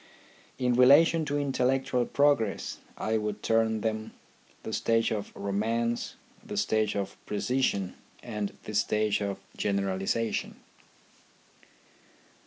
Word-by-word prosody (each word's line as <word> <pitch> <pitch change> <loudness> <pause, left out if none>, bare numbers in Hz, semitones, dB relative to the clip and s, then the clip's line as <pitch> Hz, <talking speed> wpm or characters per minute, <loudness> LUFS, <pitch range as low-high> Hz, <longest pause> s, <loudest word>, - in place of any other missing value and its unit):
In 125 -1 +1
relation 145 +6 +6
to 145 -1 -1
intellectual 135 -2 +1
progress 140 -8 +1 0.2
I 110 0 0
would 105 -1 -4
term 110 -1 +2
them, 110 0 -2 0.5
the - - -5
stage 115 0 +2
of 105 -2 -3
romance, 115 +4 -1 0.3
the - - -6
stage; 110 -1 +1
of 100 -1 -4
precision, 105 -4 0 0.3
and 105 -4 -4
the 110 - -7
stage 105 0 +1
of 100 -1 -2 0.2
generalization. 100 +2 -1
110 Hz, 105 wpm, -29 LUFS, 105-125 Hz, 0.5 s, relation